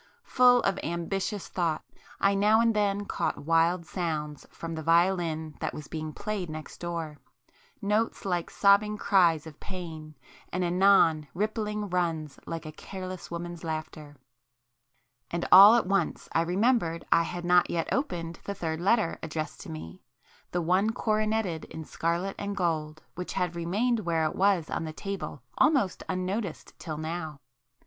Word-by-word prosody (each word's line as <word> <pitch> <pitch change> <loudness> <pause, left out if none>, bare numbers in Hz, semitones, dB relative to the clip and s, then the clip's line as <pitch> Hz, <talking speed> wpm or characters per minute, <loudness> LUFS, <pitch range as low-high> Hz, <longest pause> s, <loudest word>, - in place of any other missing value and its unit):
[p - - -27
15]Full 245 -1 +6
of 195 - +1
ambitious 185 +5 -3
thought, 170 -4 -1 0.4
I 200 0 +3
now 210 +3 +4
and 230 -1 +3
then 205 -1 +1
caught - - -2
wild 165 +2 +3
sounds 155 -5 -4
from 165 0 -7
the 160 - -4
violin 165 -1 +2
that - - -3
was 150 - -8
being 155 -1 -5
played 205 -1 -4
next 155 0 -8
door,—notes 200 - -4
like 175 -3 -1
sobbing 210 +1 +4
cries 175 -7 +3
of 155 -2 -11
pain, 160 -5 -8 0.4
and 185 +1 -1
anon 175 -4 +4
rippling 210 +1 -2
runs 165 -6 -2
like 165 -1 -5
a 155 - -6
careless 185 +2 -7
woman's 170 0 -6
laughter,—and 125 -3 -9
all 205 +4 +11
at 240 - +2
once 195 +1 0
I 165 - +3
remembered 180 -1 +1
I 170 - +6
had 175 +1 -4
not 180 0 +4
yet 165 -1 -1
opened 170 - -2
the 200 - -4
third 160 -2 -3
letter 200 -1 +2
addressed 155 +1 -5
to - - -9
me,—the 80 - -8
one 185 +6 +3
coroneted 215 -7 0
in 160 - -8
scarlet 170 +6 -2
and 200 0 -4
gold, 155 -4 -1
which 180 0 -5
had 180 -2 -1
remained 210 +8 0
where 165 -5 0
it 155 - -2
was 190 -4 +2
on - - -3
the 155 -1 -5
table 195 -7 -5 0.2
almost 275 -12 +3
unnoticed 185 0 -3
till 155 -3 -5
now. 160 -1 -5
175 Hz, 150 wpm, -28 LUFS, 160-200 Hz, 0.4 s, all